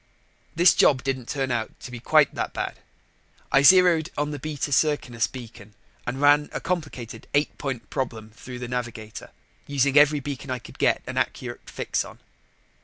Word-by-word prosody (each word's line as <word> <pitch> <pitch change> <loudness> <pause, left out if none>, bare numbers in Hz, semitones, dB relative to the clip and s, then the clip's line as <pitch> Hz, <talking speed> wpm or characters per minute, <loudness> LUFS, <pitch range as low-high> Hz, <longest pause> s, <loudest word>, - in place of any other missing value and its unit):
This 170 +1 +6
job 130 -3 +4
didn't 130 -2 -3
turn 135 -3 -1
out 115 -2 -3
to - - -8
be 125 - -7
quite 150 +4 +4
that - - -3
bad. - - -4 0.7
I 135 - +5
zeroed 175 0 +6
on 145 +1 -1
the 145 - -5
Beta 145 0 -4
Circinus 130 -6 +1
beacon 110 -4 -11 0.3
and 130 +2 -3
ran 145 +1 +4
a - - -2
complicated 150 -9 -4
eight 145 +1 +1
point 130 -5 -4
problem 115 -4 -4
through 125 +3 -9
the 125 0 -6
navigator, 120 -3 -5 0.4
using 140 0 +2
every 150 0 +5
beacon 140 0 -6
I 130 - -1
could 120 - -14
get - - +2
an - - -6
accurate - - -4
fix - - -2
on. - - -12
135 Hz, 175 wpm, -25 LUFS, 120-150 Hz, 0.7 s, This